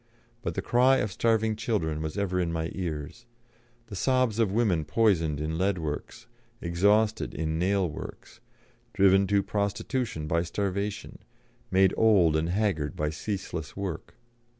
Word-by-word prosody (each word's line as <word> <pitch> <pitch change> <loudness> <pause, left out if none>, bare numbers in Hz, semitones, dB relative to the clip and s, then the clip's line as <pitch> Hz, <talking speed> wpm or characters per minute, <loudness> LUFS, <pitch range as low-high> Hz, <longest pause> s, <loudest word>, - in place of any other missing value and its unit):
But - - -3
the - - -2
cry 130 +2 +4
of 105 -5 -1
starving 110 +1 +1
children 100 -9 -1
was 80 +4 -4
ever 95 -2 0
in 85 -2 0
my 80 0 -2
ears; 85 +5 -5 0.6
the 105 - -9
sobs 130 +2 +1
of 110 -4 +2
women 100 -7 +2
poisoned 80 -7 +1
in 80 +2 -2
lead 95 0 +1
works, 80 +8 -5 0.3
exhausted 105 +5 +1
in 80 +1 -2
nail 95 +1 +2
works, 85 +7 -9 0.5
driven 95 -1 +4
to 100 0 +2
prostitution 105 - -2
by 85 +2 +1
starvation, 100 +3 -3 0.5
made 95 0 +4
old 95 -8 +4
and 80 +1 0
haggard 90 -7 0
by 75 0 -1
ceaseless 85 -3 -5
work. 95 -5 -5
95 Hz, 145 wpm, -27 LUFS, 80-110 Hz, 0.6 s, cry